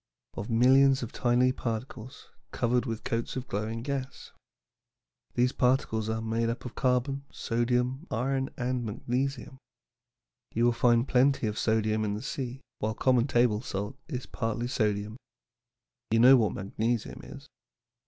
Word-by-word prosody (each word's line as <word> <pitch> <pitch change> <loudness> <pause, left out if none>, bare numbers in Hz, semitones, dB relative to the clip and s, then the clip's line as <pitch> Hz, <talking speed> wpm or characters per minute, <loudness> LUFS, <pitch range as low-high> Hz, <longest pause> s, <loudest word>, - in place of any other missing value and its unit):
"Of 105 - -6
millions 130 +3 +5
of 115 - -5
tiny 120 +1 +2
little - - -11
particles 120 +2 -5 0.2
covered 125 +2 0
with 115 -1 -4
coats 115 -2 -2
of 130 0 -4
glowing 110 +3 -3
gas. 140 0 -5 1.0
These 125 +1 +3
particles 125 -5 +1
are 110 0 -2
made 115 +1 0
up 115 - -4
of 125 - -6
carbon, 130 +2 0
sodium, 125 +5 -1
iron, 135 +3 -1
and 125 0 -1
magnesium. 125 +4 -3 1.0
You 115 +2 +3
will 120 - +5
find 120 +1 +3
plenty 130 0 +3
of 105 0 -2
sodium 110 -1 +1
in 105 -1 -1
the 105 - -6
sea, 135 -1 -4 0.2
while 110 +1 -1
common 125 -1 +3
table 120 -5 +2
salt 105 -1 -4
is 130 -5 -4
partly 120 +1 -3
sodium. 105 -2 -1 0.9
You 115 - +2
know 125 +4 +8
what 110 -5 +2
magnesium 110 +4 -2
is. - - -11
120 Hz, 145 wpm, -29 LUFS, 110-130 Hz, 1.0 s, know